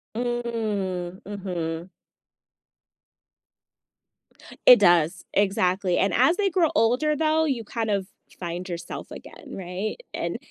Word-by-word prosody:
Mm, 215 Hz, -7 st, -2 dB
mhm. 180 Hz, -4 st, -4 dB, 2.8 s
It 250 Hz, -2 st, +10 dB
does, 175 Hz, -4 st, +3 dB
exactly, 190 Hz, -2 st, +1 dB
and 195 Hz, -3 st, +2 dB
as 265 Hz, +8 st, +4 dB
they 400 Hz, -2 st, +2 dB
grow 340 Hz, -3 st, +2 dB
older, 250 Hz, +7 st, +2 dB
though, 315 Hz, 0 st, +2 dB
you 265 Hz, -7 st, -1 dB
kind 225 Hz, 0 st, -3 dB
of 200 Hz, -2 st, 0 dB, 0.3 s
find 175 Hz, +1 st, -5 dB
yourself 170 Hz, -1 st, -6 dB
again, 285 Hz, -, -11 dB
right, 190 Hz, +3 st, -4 dB, 0.2 s
and -, -, -3 dB
205 Hz, 110 wpm, -25 LUFS, 180-245 Hz, 2.8 s, It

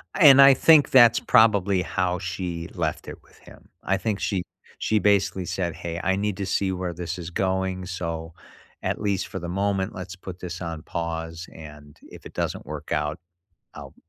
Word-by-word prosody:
And 140 Hz, -6 st, +8 dB
I 135 Hz, 0 st, +9 dB
think 150 Hz, +2 st, +5 dB
that's 120 Hz, -3 st, +6 dB
probably 100 Hz, -4 st, +4 dB
how 90 Hz, -1 st, -1 dB
she 90 Hz, -2 st, -4 dB
left 80 Hz, -6 st, -3 dB
it -, -, -9 dB
with -, -, -23 dB
him. -, -, -17 dB
I 95 Hz, -, +1 dB
think 105 Hz, +1 st, -2 dB
she 95 Hz, -3 st, -1 dB, 0.4 s
she 110 Hz, -, +1 dB
basically 95 Hz, -2 st, +1 dB
said, 85 Hz, -2 st, -3 dB
"Hey. 85 Hz, -1 st, -5 dB
I 95 Hz, -, +2 dB
need 100 Hz, 0 st, -2 dB
to 100 Hz, -, -3 dB
see 95 Hz, 0 st, 0 dB
where 90 Hz, -1 st, -3 dB
this 85 Hz, +1 st, -5 dB
is 85 Hz, -2 st, -6 dB
going, 95 Hz, 0 st, -1 dB
so 85 Hz, -3 st, -5 dB, 0.5 s
at -, -, -2 dB
least 100 Hz, -3 st, -1 dB
for 95 Hz, -, -6 dB
the 85 Hz, -1 st, -6 dB
moment, 95 Hz, +1 st, -1 dB
let's 95 Hz, 0 st, -7 dB
put 95 Hz, -1 st, -9 dB
this 90 Hz, 0 st, -7 dB
on 80 Hz, -2 st, -5 dB
pause. 80 Hz, 0 st, -5 dB
And 75 Hz, -2 st, -13 dB
if -, -, -14 dB
it -, -, -17 dB
doesn't -, -, -3 dB
work -, -, -8 dB
out, 75 Hz, +1 st, -1 dB, 0.5 s
I'll" -, -, -10 dB
95 Hz, 190 wpm, -24 LUFS, 85-100 Hz, 0.5 s, I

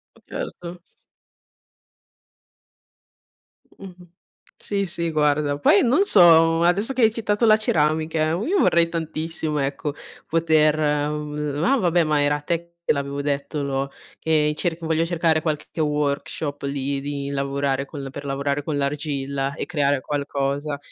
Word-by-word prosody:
Ma -, -, -21 dB
certo. 175 Hz, 0 st, -7 dB, 2.9 s
Mh-mh. 180 Hz, -2 st, -13 dB, 0.5 s
Sì, 200 Hz, -1 st, -2 dB
sì, 170 Hz, -1 st, -2 dB
guarda. 150 Hz, -2 st, +1 dB
Poi 200 Hz, +7 st, +4 dB
non 270 Hz, +11 st, +3 dB
so, 165 Hz, -, +6 dB
adesso 195 Hz, +8 st, +2 dB
che 260 Hz, -1 st, -1 dB
hai 220 Hz, -1 st, +5 dB
citato 215 Hz, 0 st, -1 dB
la 215 Hz, -1 st, +7 dB
ceramica, 155 Hz, -4 st, +1 dB
io 255 Hz, -, 0 dB
vorrei 170 Hz, 0 st, +3 dB
tantissimo, 160 Hz, -1 st, -3 dB
ecco, 140 Hz, +1 st, -2 dB, 0.4 s
poter 155 Hz, -2 st, +3 dB
n 150 Hz, 0 st, -1 dB
ah, 275 Hz, -, +3 dB
vabbè, 175 Hz, -4 st, +2 dB
ma 150 Hz, -1 st, +1 dB
era 145 Hz, +1 st, +2 dB
a -, -, -7 dB
te 170 Hz, +2 st, -3 dB
che -, -, +3 dB
l'avevo 140 Hz, 0 st, -3 dB
detto 145 Hz, +1 st, -2 dB
lo 135 Hz, 0 st, -2 dB, 0.3 s
e 155 Hz, -1 st, +2 dB
cerc 170 Hz, 0 st, -2 dB
voglio 160 Hz, 0 st, +1 dB
cercare 165 Hz, -2 st, +1 dB
qualche 155 Hz, 0 st, -4 dB
workshop 150 Hz, 0 st, -2 dB
lì, 140 Hz, 0 st, -2 dB
di 140 Hz, 0 st, -4 dB
lavorare 140 Hz, 0 st, -1 dB
con 140 Hz, -1 st, -7 dB
per 145 Hz, +2 st, -8 dB
lavorare 140 Hz, +1 st, -2 dB
con 150 Hz, 0 st, -3 dB
l'argilla 140 Hz, -1 st, -2 dB
e -, -, -5 dB
creare 145 Hz, -5 st, +1 dB
qualcosa. 140 Hz, 0 st, -2 dB
150 Hz, 140 wpm, -23 LUFS, 140-170 Hz, 2.9 s, la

